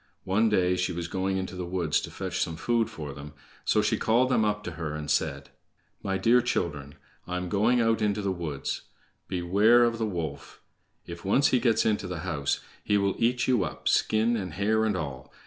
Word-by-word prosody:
One 105 +4 +2
day 90 -3 +2
she 90 0 0
was 85 -1 -4
going 95 +1 -1
into 95 -1 -4
the 90 - -4
woods 85 -4 0
to - - -6
fetch - - -4
some 85 - -1
food 115 +6 0
for 75 -3 -7
them, 70 +1 -10 0.3
so 105 - +2
she 105 - +1
called 120 +3 +3
them 120 -4 +3
all 105 - +3
up 105 0 -3
to 90 - -5
her, 80 -2 -5
and 75 -1 -4
said: - - -1 0.5
"My 95 -1 -1
dear 115 +6 +4
children, 75 - -2 0.3
I 90 0 -2
am 90 0 -4
going 110 +6 +3
out 115 -1 +2
into 105 -1 0
the 100 - 0
woods. 80 -6 -4 0.5
Beware 100 +7 +4
of 115 -1 +1
the 110 - 0
wolf! 85 -7 -5 0.5
If 85 +1 -9
once 130 +9 +3
he 125 - +3
gets 115 -2 +2
into 105 -3 0
the 90 -3 -5
house, 75 -6 -1 0.2
he 105 - +2
will 100 -1 +1
eat 120 +2 +1
you 125 -6 +3
up, 75 - -5
skin, 110 +2 +2
and 95 -7 -4
hair, 110 +3 +1
and 105 -3 0
all. 65 -6 -6
95 Hz, 215 wpm, -27 LUFS, 85-110 Hz, 0.5 s, dear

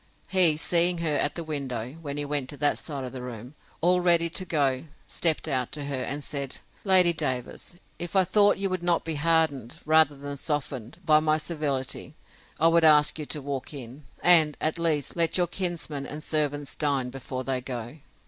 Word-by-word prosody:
He, 175 -5 +5
seeing 175 +2 +2
her 165 -2 -1
at 145 - 0
the 170 - -4
window, 130 -6 -4
when 145 -2 -5
he 145 - -1
went 145 -3 -2
to 145 - -7
that 145 +1 +1
side 140 -4 -6
of 125 - -6
the 130 - -7
room, 125 +1 -8 0.3
all 180 +2 +3
ready 170 -1 +3
to 185 +2 -3
go, 140 -5 0 0.2
stept 160 -2 +1
out 130 -4 -1
to 145 -1 -3
her, 140 -2 -3
and 140 +3 -4
said, 140 -2 -4 0.3
Lady 185 -3 +5
Davers, 130 +2 -3 0.2
if 175 +2 -6
I 190 - +6
thought 205 +2 +3
you 195 0 -1
would 185 -1 -2
not 175 -1 0
be 165 - -2
hardened, 150 -5 +1
rather 155 -1 +4
than 140 0 -7
softened, 135 -5 -4
by 155 -2 +6
my 155 0 +2
civility, 145 -3 -3 0.4
I 165 - +5
would 165 0 +4
ask 150 0 +5
you 150 - -5
to 150 -3 -4
walk 140 +1 -5
in; 135 +2 -10 0.2
and, 160 -4 +6
at 155 +2 -1
least, 155 -4 0
let 165 0 +1
your 180 - +3
kinsman 170 -5 -3
and 150 +1 -6
servants 145 -2 -1
dine 140 -4 0
before 130 0 -6
they 130 -1 -2
go. 125 +1 -6
150 Hz, 195 wpm, -26 LUFS, 135-165 Hz, 0.4 s, I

